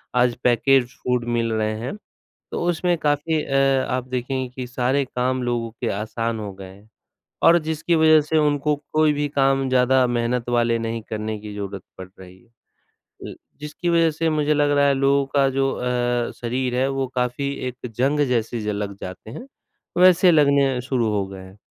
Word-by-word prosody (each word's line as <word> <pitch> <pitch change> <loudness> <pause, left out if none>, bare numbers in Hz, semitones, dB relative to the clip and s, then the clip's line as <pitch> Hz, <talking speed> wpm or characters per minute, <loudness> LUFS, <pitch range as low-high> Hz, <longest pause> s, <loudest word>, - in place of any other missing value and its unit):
आज 125 -1 +3
package 125 +1 +2
food 125 -1 0
मिल 115 -1 0
रहे 110 0 0
हैं, 125 - -5 0.6
तो - - -3
उसमें 175 +1 0
काफ़ी 150 +1 0
अ, 135 - -5 0.4
आप 130 0 -2
देखेंगे 130 +1 -3
कि 125 - -4
सारे 130 +2 0
काम 130 0 -2
लोगों 120 -1 -2
के - - -1
आसान 115 +2 -3
हो 105 -2 -6
गए 95 0 -10
हैं, 100 +3 -18 0.6
और 170 - +7
जिसकी 160 +1 -1
वज़ह 155 -1 +5
से 150 +2 -1
उनको 150 0 +1 0.2
कोई 155 -1 +3
भी 145 0 -1
काम 135 -1 +1
ज़्यादा 130 0 +3
मेहनत 120 0 -1
वाले 120 -1 +2
नहीं 115 0 -3
करने 110 0 -3
की 105 0 -9
ज़रूरत 100 -2 -6 0.2
पड़ 95 - -8
रही 95 0 -13
है। 115 - -29 0.8
ल - - -11 0.3
जिसकी 150 +3 -4
वज़ह 165 -1 +4
से 160 +2 -1
मुझे 150 -1 +1
लग 145 -1 +2
रहा 140 - +4
है 140 - +3
लोगों 140 +1 +2
का 140 -1 +4
जो 135 0 0
अ, 120 -1 -1
शरीर 125 +1 -2
है 130 +2 +1
वो 135 0 -1
काफ़ी 125 +3 -1 0.2
एक 125 0 -7
जंग 140 +5 +1
जैसे 120 -1 -1
ज 105 - -6
लग 100 -1 -3
जाते 95 +4 -8
हैं, 240 - -8 0.6
वैसे 180 0 +6
लगने 140 -4 +3
शुरू 125 -3 -1
हो 100 -2 0
गए 95 -1 -10
हैं। 95 +1 -14
125 Hz, 190 wpm, -22 LUFS, 115-145 Hz, 0.8 s, और